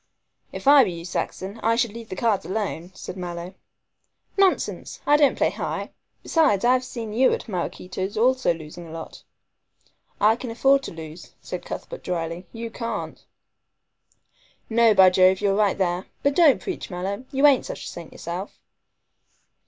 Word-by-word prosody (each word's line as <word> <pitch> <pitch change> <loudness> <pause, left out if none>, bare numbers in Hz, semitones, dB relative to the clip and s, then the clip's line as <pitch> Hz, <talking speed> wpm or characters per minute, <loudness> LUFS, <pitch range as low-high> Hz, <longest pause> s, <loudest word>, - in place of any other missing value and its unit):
"If - - -7
I 285 0 +9
were 225 - +2
you, 170 -1 -7
Saxon, 190 +3 -4
I 230 +1 +2
should 235 -3 0
leave 230 -1 -9
cards 220 -3 +1
alone," 190 -3 -3
said - - -7
Mallow. 175 0 -6 0.8
"Nonsense! 390 -2 +1
I 290 - +5
don't 290 -2 +4
play - - +2
high. - - -4 0.3
Besides, 275 - +2
I 250 - +6
have 255 0 +1
seen 230 -4 -6
you 255 +4 +4
at - - -4
Maraquito's 185 0 -4
also 255 -1 +3
losing 165 +1 -8
a - - -11
lot." 160 0 -8 1.0
"I 215 +2 +5
can 245 - -6
afford 270 +4 +3
to - - -6
lose," 160 +1 -10
said - - -7
Cuthbert - - -7
dryly, 170 +1 -4
"you 230 0 -6
can't." 230 0 -5 1.5
"No, 230 -1 +5
by 190 -1 +7
Jove, 185 +1 +5
you're 200 -1 +2
right 205 -1 +2
there. 180 -1 -1 0.2
But 280 0 +2
don't 315 -6 +5
preach, 380 - -5
Mallow, 195 +6 -4
you 275 +1 +3
ain't 280 -3 +5
such - - -6
a - - -6
saint 170 -2 -9
yourself." 175 +4 -6
205 Hz, 165 wpm, -24 LUFS, 180-250 Hz, 1.5 s, I